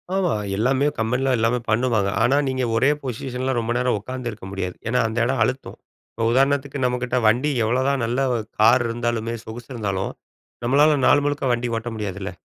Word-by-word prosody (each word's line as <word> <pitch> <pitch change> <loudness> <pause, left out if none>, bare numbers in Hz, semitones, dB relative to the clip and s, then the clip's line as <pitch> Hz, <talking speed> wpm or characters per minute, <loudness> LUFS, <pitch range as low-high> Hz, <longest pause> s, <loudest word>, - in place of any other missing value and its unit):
ஆமா. 190 -3 +1 0.2
எல்லாமே 130 +5 +2
கம்பெனியில 125 +4 +1
எல்லாமே 115 +2 +1
பண்ணுவாங்க. 110 -3 +2
ஆனா, 130 +5 +3
நீங்க 130 -1 -1
ஒரே 130 +5 +3
பொசிஷனில 130 +1 -3
ரொம்ப 115 0 -2
நேரம் 125 -2 +1
உட்காந்து 125 +3 -5
இருக்க 105 -3 -11
முடியாது. 90 -2 -4
ஏனா, 125 +2 +1
அந்த 110 +1 -5
இடம் 130 0 0
அழுத்தும், 130 +4 -3 0.4
இப்போ 115 - -2
உதாரணத்துக்கு 140 +1 +1
நம்ம 125 0 0
கிட்ட 125 0 -1
வண்டி 125 +7 +2
எவ்வளோதான் 130 +3 +1
நல்ல 120 +3 -1
வ - - +1 0.3
கார் 120 +3 +5
இருந்தாலுமே, 115 -1 -2
சொகுசு 115 +3 -9
இருந்தாலும், 100 -5 -2 0.5
நம்மளால 145 +4 +4
நாள் 145 0 +5
முழுக்க 145 -1 -1
வண்டி 120 0 -2
ஓட்ட 115 +1 -4
முடியாதுல்ல. 100 -2 -4
125 Hz, 175 wpm, -22 LUFS, 115-130 Hz, 0.5 s, கார்